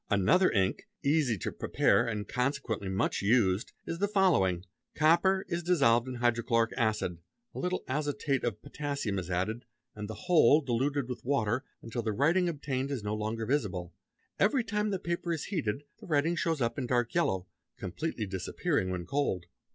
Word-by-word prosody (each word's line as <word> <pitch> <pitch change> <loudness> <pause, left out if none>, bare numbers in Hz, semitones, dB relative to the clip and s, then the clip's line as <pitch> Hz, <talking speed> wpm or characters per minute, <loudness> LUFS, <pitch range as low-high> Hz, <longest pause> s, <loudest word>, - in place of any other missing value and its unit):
Another 110 - +4
ink, 95 -2 0 0.2
easy 140 -6 +2
to - - -3
prepare 120 - +2
and 105 -3 -3
consequently 125 -6 -1
much 95 0 0
used, 100 -1 +2
is 165 - -4
the 205 - +2
following: 145 - +2 0.3
copper 180 +5 +4
is 170 0 -2
dissolved 135 -9 +3
in 130 - -4
hydrochloric 115 -1 +1
acid, 110 -8 0 0.3
a - - -6
little 180 +1 -1
azotate 145 -1 -1
of 115 -4 -1
_ - - -45
potassium 140 -8 -3
is 90 -1 -6
added, 95 +7 -1 0.3
and 105 -1 -6
the 110 - -8
whole 160 -5 +6
diluted 135 +1 0
with 125 - -6
water, 120 -3 0 0.2
until 115 +1 -3
the 110 -2 -1
writing 170 - +3
obtained 140 -4 -2
is 135 -7 -3
no 105 0 -2
longer 110 +1 -2
visible. 95 - -1 0.5
Everytime 210 -1 +2
the 195 - 0
paper 170 -1 -3
is 160 - -3
heated 145 - -2 0.2
the - - -12
writing 160 +1 +2
starts 165 -3 0
up 115 +3 0
in 125 - -2
dark 120 -1 +1
yellow, 95 - +1 0.3
completely 115 - -3
disappearing 95 0 -1
when 90 -1 -3
cold. 95 -7 -1
125 Hz, 170 wpm, -30 LUFS, 105-155 Hz, 0.5 s, whole